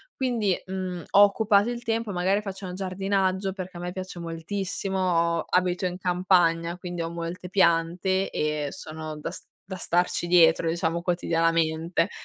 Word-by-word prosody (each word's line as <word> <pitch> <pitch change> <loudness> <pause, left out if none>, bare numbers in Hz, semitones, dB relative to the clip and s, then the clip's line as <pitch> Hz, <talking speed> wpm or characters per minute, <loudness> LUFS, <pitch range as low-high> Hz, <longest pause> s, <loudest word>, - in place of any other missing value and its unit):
quindi, 235 -7 +1
mhmm, 185 -2 -4
ho 200 - +7
occupato 205 +1 +3
il 240 0 -4
tempo 225 -2 -1
magari 190 +3 +1
faccio 195 -1 -7
un 180 - -6
giardinaggio 190 0 -1
perché 185 -1 -7
a - - -7
me 180 - -4
piace 185 -1 -6
moltissimo 190 +3 -3 0.4
ho - - -3
abito 180 0 +1
in 180 0 -2
campagna, 175 -2 +2
quindi 175 -1 -5
ho 165 - -2
molte 170 +2 -6
piante 180 +1 +2
e 150 -1 -1
sono 155 -1 -7
da - - -4
s - - -10 0.2
da 190 - -4
starci 175 0 0
dietro, 165 -1 +5
diciamo, 165 0 -1
quotidianamente. 165 0 +1
180 Hz, 155 wpm, -26 LUFS, 165-195 Hz, 0.4 s, ho